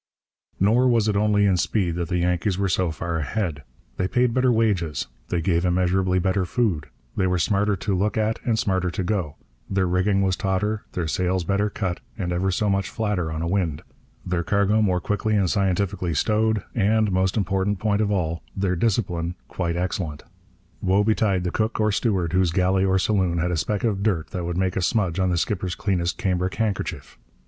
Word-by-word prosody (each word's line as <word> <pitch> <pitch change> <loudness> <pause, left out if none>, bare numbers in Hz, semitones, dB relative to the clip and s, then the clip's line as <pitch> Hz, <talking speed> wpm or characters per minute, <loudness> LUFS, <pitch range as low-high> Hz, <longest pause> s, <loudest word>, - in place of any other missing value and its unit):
Nor 115 +6 +4
was 115 -3 +3
it 105 - +1
only 105 0 +3
in 95 -2 +3
speed 90 -1 0
that 85 0 -3
the 90 - 0
Yankees 90 +2 0
were 100 0 +1
so 90 -1 +1
far 85 +1 -3
ahead. 80 -1 -2 0.4
They 90 - 0
paid 125 +2 +1
better 130 0 +3
wages, 100 - +1 0.2
they 85 - -1
gave 85 0 +1
immeasurably 90 +1 +2
better 95 +1 +1
food, 100 - 0 0.3
they 95 - +1
were 90 0 +1
smarter 100 +4 +1
to 95 +1 -2
look 100 +3 0
at 110 +1 0
and 115 -2 +1
smarter 95 -6 0
to 90 - -3
go, 90 -6 -2 0.3
their 95 -1 +1
rigging 95 +2 +2
was 95 -1 +1
tauter, 105 +3 -1
their 85 -3 -2
sails 90 +2 0
better 100 +4 0
cut 95 -4 -3 0.2
and 90 -4 -2
ever 95 +2 0
so 100 +3 0
much 100 -1 0
flatter 105 -7 -1
on 80 +1 -3
a - - -1
wind, 85 -5 -1 0.4
their 90 -2 0
cargo 100 +3 +2
more 95 -4 +2
quickly 105 +3 0
and 95 -4 +2
scientifically 95 -3 0
stowed, 110 +5 +1
and, 110 -1 +2
most 95 +2 +1
important 95 0 0
point 105 +2 +1
of 105 - +1
all, 85 -5 -1 0.2
their 95 -2 +1
discipline 90 -4 0
quite 85 -2 -2
excellent. 90 -4 -3 0.6
Woe 95 +2 +3
betide 105 -3 +1
the 90 - -1
cook 110 +4 -1
or 105 0 +2
steward 95 -6 0
whose 90 -1 +3
galley 95 +2 +2
or 95 0 +2
saloon 95 -3 +1
had 90 +1 0
a - - 0
speck 100 +5 -1
of 105 -4 0
dirt 95 -7 0
that 90 -2 -3
would 85 0 -3
make 95 -1 0
a 95 - 0
smudge 95 -1 0
on 95 0 +2
the 90 - +1
skipper's 90 0 -1
cleanest 90 -3 -1
cambric 90 0 -1
handkerchief! 110 -4 -3
95 Hz, 200 wpm, -24 LUFS, 90-105 Hz, 0.6 s, Nor